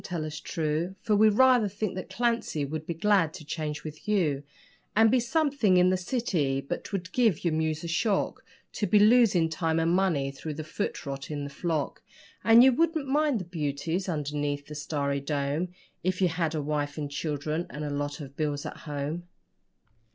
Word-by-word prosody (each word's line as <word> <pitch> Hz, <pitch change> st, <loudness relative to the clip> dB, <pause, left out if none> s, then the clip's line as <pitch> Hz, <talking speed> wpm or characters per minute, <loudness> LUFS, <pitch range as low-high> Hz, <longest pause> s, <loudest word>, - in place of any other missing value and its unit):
tell 170 Hz, -4 st, -3 dB
us 150 Hz, 0 st, -5 dB
true, 160 Hz, +4 st, -2 dB
For 215 Hz, -2 st, +2 dB
we 215 Hz, +1 st, +6 dB
rather 245 Hz, 0 st, +5 dB
think 205 Hz, 0 st, -3 dB
that 185 Hz, -, -6 dB
Clancy 230 Hz, -11 st, 0 dB
would 155 Hz, +3 st, -5 dB
be 170 Hz, -, -2 dB
glad 190 Hz, -3 st, +2 dB
to 155 Hz, -, -10 dB
change 150 Hz, -1 st, -4 dB
with 155 Hz, +3 st, -9 dB
you, 165 Hz, -10 st, +1 dB, 0.5 s
And 220 Hz, +1 st, +6 dB
be 255 Hz, -, +4 dB
something 270 Hz, -, +2 dB
in 180 Hz, +1 st, +5 dB
the -, -, +3 dB
city; 180 Hz, -, 0 dB
but 135 Hz, -, -4 dB
'twould 185 Hz, -4 st, -5 dB
give 225 Hz, -10 st, +2 dB
your 170 Hz, -, +2 dB
muse 160 Hz, 0 st, -1 dB
a -, -, -4 dB
shock 190 Hz, +5 st, 0 dB, 0.3 s
To 205 Hz, -, -2 dB
be 210 Hz, -, +4 dB
losing 210 Hz, -5 st, +5 dB
time 160 Hz, 0 st, -1 dB
and 165 Hz, +1 st, +2 dB
money 170 Hz, -7 st, +1 dB
through 150 Hz, +2 st, -6 dB
the 155 Hz, -, -5 dB
foot 165 Hz, +3 st, -4 dB
rot 140 Hz, 0 st, -5 dB
in 145 Hz, -2 st, -3 dB
the 140 Hz, -, -6 dB
flock, 160 Hz, -1 st, -2 dB, 0.4 s
And 230 Hz, +1 st, +8 dB
you 265 Hz, -, +7 dB
wouldn't 320 Hz, +1 st, +1 dB
mind 290 Hz, -2 st, +2 dB
the -, -, -7 dB
beauties 165 Hz, +2 st, -2 dB
underneath 145 Hz, -2 st, -2 dB
the 150 Hz, -, -9 dB
starry 140 Hz, -1 st, -2 dB
dome 145 Hz, +4 st, -1 dB, 0.4 s
If 185 Hz, +1 st, 0 dB
you 185 Hz, -2 st, +3 dB
had 165 Hz, -1 st, -1 dB
a 150 Hz, -, -1 dB
wife 145 Hz, 0 st, -2 dB
and 145 Hz, -2 st, -4 dB
children 150 Hz, +3 st, -2 dB
and 150 Hz, 0 st, -5 dB
a 145 Hz, -, -3 dB
lot 145 Hz, +1 st, -3 dB
of 140 Hz, -1 st, -9 dB
bills 145 Hz, -1 st, -2 dB
at -, -, -6 dB
home. 150 Hz, +4 st, -3 dB
165 Hz, 195 wpm, -28 LUFS, 150-205 Hz, 0.5 s, And